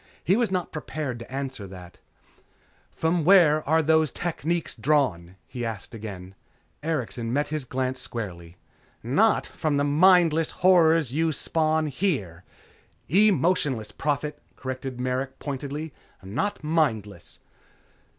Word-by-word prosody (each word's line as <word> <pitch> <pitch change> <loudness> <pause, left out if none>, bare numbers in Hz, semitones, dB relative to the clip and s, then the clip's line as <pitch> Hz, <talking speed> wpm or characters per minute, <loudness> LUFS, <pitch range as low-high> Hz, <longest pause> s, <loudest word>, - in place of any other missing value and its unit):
He 185 - +3
was 235 0 +1
not 180 -2 -2
prepared 150 -5 -4
to 115 - -11
answer 135 -6 -5
that. 90 -2 -12 0.9
"From 165 +1 0
where 165 -4 +6
are 160 +1 +4
the 160 +1 +4
techniques 170 +1 -2
drawn?" 110 - 0
he 120 -2 -6
asked 115 -1 -5
again. 100 -4 -8 0.5
Erikson 145 -7 -3
met 145 +4 0
his 155 -3 -3
glance 130 0 -2
squarely. 90 -6 -7 0.5
"Not - - +3
from 150 -2 -2
the 145 - +2
mindless 165 +1 +4 0.2
horrors 165 -6 +5
you 160 +2 +1
spawn 155 +1 0
here!" 130 - -2 0.7
"Emotionless, 170 - +2
Prophet," 150 +4 -2
corrected 130 -1 -6
Merrick 130 +1 -2
pointedly, 145 +2 -5 0.3
"Not 155 - -3
mindless." 115 - -1
145 Hz, 120 wpm, -25 LUFS, 120-160 Hz, 0.9 s, where